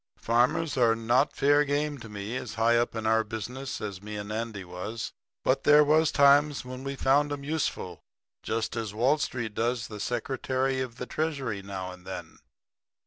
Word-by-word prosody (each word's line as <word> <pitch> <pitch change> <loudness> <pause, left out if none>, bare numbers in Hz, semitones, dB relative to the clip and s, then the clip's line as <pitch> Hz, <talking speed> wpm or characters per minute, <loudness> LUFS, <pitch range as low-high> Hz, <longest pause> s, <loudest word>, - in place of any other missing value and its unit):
Farmers 125 +7 +1
are 115 -3 +4
not 120 +5 +2
fair 145 +1 +4
game 145 0 -1
to 115 - -10
me 105 +3 -5
as 120 -4 -5
high 115 +2 +3
up 120 0 +1
in 110 0 -3
our 110 0 +3
business 120 +5 -5
as 100 -3 -5
me 105 +1 -7
and 105 +1 -6
Andy 110 -2 -3
was; 90 +6 -6 0.3
but - - +2
there 150 0 +7
was 155 +1 +4
times 140 0 +4
when 130 +1 -7
we 135 0 -3
found 145 +2 +3
'em 145 -1 -4
useful, 140 - -2 0.4
just 115 +1 -2
as 110 -3 -4
Wall 130 +7 +3
Street 120 -6 -3
does 120 +2 -1
the 105 -1 -7
Secretary 130 +3 -1
of 125 -3 -5
the 125 - -5
Treasury 135 -9 -2
now 95 -2 -5
and 90 0 -13
then. - - -7
120 Hz, 185 wpm, -28 LUFS, 110-140 Hz, 0.4 s, there